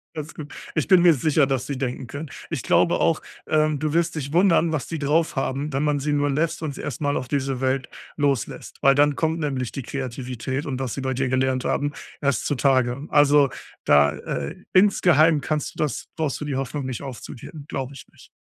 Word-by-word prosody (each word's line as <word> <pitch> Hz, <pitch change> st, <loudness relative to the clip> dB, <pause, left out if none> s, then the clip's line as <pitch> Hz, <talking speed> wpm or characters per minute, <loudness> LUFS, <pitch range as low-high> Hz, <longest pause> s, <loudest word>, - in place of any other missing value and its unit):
Alles 155 Hz, +1 st, -6 dB
gut. 145 Hz, -2 st, -9 dB, 0.2 s
Ich 155 Hz, -, 0 dB
bin 185 Hz, -3 st, +6 dB
mir 175 Hz, -1 st, +7 dB
sicher, 150 Hz, +1 st, +2 dB
dass 130 Hz, -1 st, -1 dB
sie 140 Hz, -2 st, -3 dB
denken 125 Hz, -1 st, -3 dB
können. 145 Hz, +4 st, -7 dB, 0.2 s
Ich -, -, -3 dB
glaube -, -, +3 dB
auch, -, -, +2 dB, 0.3 s
ähm 155 Hz, -1 st, +2 dB
du 155 Hz, +1 st, -1 dB
wirst 170 Hz, 0 st, +1 dB
dich 140 Hz, 0 st, -4 dB
wundern, 170 Hz, -2 st, +4 dB
was 145 Hz, -6 st, -2 dB
die 165 Hz, -2 st, -4 dB
draufhaben, 145 Hz, -1 st, 0 dB
wenn 140 Hz, +2 st, 0 dB
man 150 Hz, -1 st, +1 dB
sie 150 Hz, +2 st, -1 dB
nur 145 Hz, 0 st, +1 dB
lässt 155 Hz, +4 st, 0 dB
und 145 Hz, -3 st, -3 dB
sie -, -, -7 dB
erst 140 Hz, +1 st, -5 dB
mal 145 Hz, 0 st, +1 dB
auf 130 Hz, -, -4 dB
diese 135 Hz, -2 st, -1 dB
Welt 130 Hz, 0 st, 0 dB, 0.3 s
loslässt, 140 Hz, -6 st, -1 dB
weil 135 Hz, 0 st, +5 dB
dann 145 Hz, 0 st, +4 dB
kommt 160 Hz, 0 st, 0 dB
nämlich 135 Hz, -5 st, -2 dB
die 135 Hz, -, -5 dB
Kreativität 130 Hz, +2 st, -4 dB
und 135 Hz, -3 st, -3 dB
was 130 Hz, -4 st, -3 dB
sie 135 Hz, -, -4 dB
bei 130 Hz, 0 st, -1 dB
dir 130 Hz, 0 st, -1 dB
gelernt 130 Hz, 0 st, +1 dB
haben, 145 Hz, 0 st, 0 dB, 0.3 s
erst 140 Hz, -5 st, 0 dB
zutage. 130 Hz, -1 st, +1 dB
Also 145 Hz, -1 st, +5 dB, 0.4 s
da, 75 Hz, 0 st, +5 dB
äh, 70 Hz, -2 st, -5 dB
insgeheim 170 Hz, -6 st, +5 dB
kannst 150 Hz, +2 st, -2 dB
du -, -, -16 dB
das 145 Hz, -, -3 dB
brauchst 155 Hz, -4 st, -2 dB
du 150 Hz, -, -3 dB
die 140 Hz, -3 st, -2 dB
Hoffnung 135 Hz, +1 st, -3 dB
nicht 130 Hz, -1 st, -4 dB
aufzugeben, 135 Hz, +3 st, -9 dB
glaube 135 Hz, 0 st, -4 dB
ich 135 Hz, -, -12 dB
nicht. -, -, -18 dB
140 Hz, 210 wpm, -23 LUFS, 130-150 Hz, 0.4 s, mir